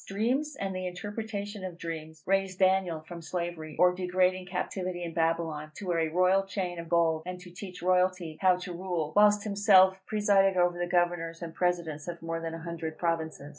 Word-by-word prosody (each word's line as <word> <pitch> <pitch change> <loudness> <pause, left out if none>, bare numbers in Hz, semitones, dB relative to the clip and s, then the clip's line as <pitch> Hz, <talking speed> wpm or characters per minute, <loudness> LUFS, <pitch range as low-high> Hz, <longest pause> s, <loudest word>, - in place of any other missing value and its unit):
Dreams, 255 +9 0
and 195 -1 -3
the 185 0 -3
interpretation 205 +2 -5
of 180 -2 -6
dreams, 160 -2 -7
raised 195 -1 0
a 190 - +6
Daniel 185 -4 +1
from 170 +2 -9
slavery 170 -2 -4
or 180 0 +5
degrading 185 0 +1
captivity 180 -1 -3
in 170 -1 -5
Babylon, 165 -2 -1
to 205 - -7
wear 175 -2 0
a 160 -1 +1
royal 185 +3 +3
chain 185 -3 -4
of 170 -1 -7
gold, 165 -2 +3
and 180 0 -5
to 180 -1 -12
teach 180 0 -9
royalty 180 -3 +1
how 185 -1 +5
to 180 0 -6
rule, 170 -4 -3
whilst 210 0 +5
himself 195 -2 +5
presided 200 -3 +3
over 175 0 +2
the 175 - -1
governors 175 -1 0
and 165 -1 -6
presidents 170 -4 -1
of 170 -1 -5
more 165 0 -3
than 165 0 -4
a 165 - -8
hundred 165 -2 -5
provinces. 160 -4 -2
180 Hz, 195 wpm, -29 LUFS, 165-190 Hz, -, a